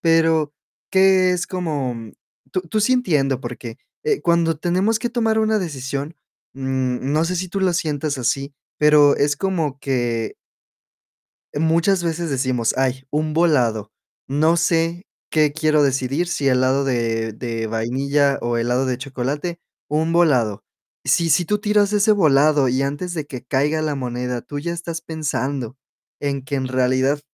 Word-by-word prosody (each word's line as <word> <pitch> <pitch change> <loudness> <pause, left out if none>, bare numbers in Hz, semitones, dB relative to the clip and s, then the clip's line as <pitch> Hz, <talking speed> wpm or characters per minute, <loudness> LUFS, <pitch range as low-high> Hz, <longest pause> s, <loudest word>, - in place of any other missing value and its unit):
Pero, 160 -2 +2 0.4
¿qué 190 -1 +5
es, 180 0 -2
como? 150 -9 -2 0.6
Tú 185 - 0
tú 185 +5 -2
sí 215 +5 +3
entiendo. 145 - +1
Porque, 120 -2 -7 0.3
eh, 440 -2 +1
cuando 170 -2 +2
tenemos 185 +7 +1
que 240 +1 -2
tomar 225 -2 +1
una 220 0 +2
decisión, 140 -3 -4 0.4
mm, 130 -1 -2
no 155 +2 +2
sé 180 +2 -1
si 185 +1 -2
tú 195 - -3
lo 190 -2 +2
sientas 150 -3 -1
así, 135 +3 -1 0.2
pero 150 -1 +5
es 145 +1 +2
como 160 -7 -2
que 120 -4 -1 1.2
muchas 165 +4 +2
veces 170 -1 -2
decimos: 130 -3 0
"Ay, 130 0 0
un 155 +1 -1
volado. 125 -11 +2 0.4
No 155 +5 +2
sé 165 +1 +1 0.3
qué 155 -2 +3
quiero 155 -1 +2
decidir. 135 +4 0
Si 145 -5 -1
helado 130 +1 +2
de 115 -4 -1
de 115 0 -4
vainilla, 135 +5 0
o 120 0 -1
helado 125 +3 +1
de 125 - -1
chocolate. 140 +6 -4 0.3
Un 155 +2 0
volado". 125 - +2 0.4
Si 170 -1 +2
si 170 +3 +3
tú 210 +2 0
tiras 210 -1 +2
ese 210 +1 +4
volado, 150 -6 +4
y 130 +2 0
antes 145 +6 -3
de 155 -4 -3
que 130 -4 -8
caiga 150 +5 +1
la 150 -1 -1
moneda, 125 -1 -3
tú 145 - -7
ya 170 +4 -3
estás 170 -1 -5
pensando, 140 -6 -3 0.4
en 140 -1 -2
que 140 - -3
en 130 -1 -1
realidad, 130 +2 +1
145 Hz, 155 wpm, -21 LUFS, 130-170 Hz, 1.2 s, qué